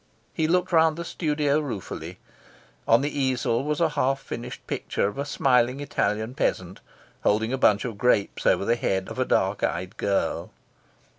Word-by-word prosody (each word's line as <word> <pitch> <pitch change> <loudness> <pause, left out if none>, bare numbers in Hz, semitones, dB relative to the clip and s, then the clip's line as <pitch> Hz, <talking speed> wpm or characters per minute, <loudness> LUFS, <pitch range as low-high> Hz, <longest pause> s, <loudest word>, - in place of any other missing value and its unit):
He 155 - 0
looked 180 +3 +1
round 160 -1 +4
the 170 - -5
studio 150 -3 0
ruefully. 125 -11 -6 0.7
On 115 +2 +5
the 145 0 -2
easel 130 -2 +1
was 150 0 -1
a 165 -2 +3
half 135 -2 0
finished 120 -2 -7
picture - - -1
of 105 +7 -6
a 140 - -1
smiling 130 -2 +2
Italian 110 -5 -1
peasant, 95 -7 -2 0.4
holding 110 +4 +1
a - - 0
bunch 105 -2 +3
of 110 -5 -5
grapes 125 -5 +1
over - - +3
the 115 - +3
head 95 -5 -1
of - - -7
a - - +2
dark - - +1
eyed 90 0 -2
girl. 100 -1 -1
130 Hz, 170 wpm, -25 LUFS, 110-150 Hz, 0.7 s, On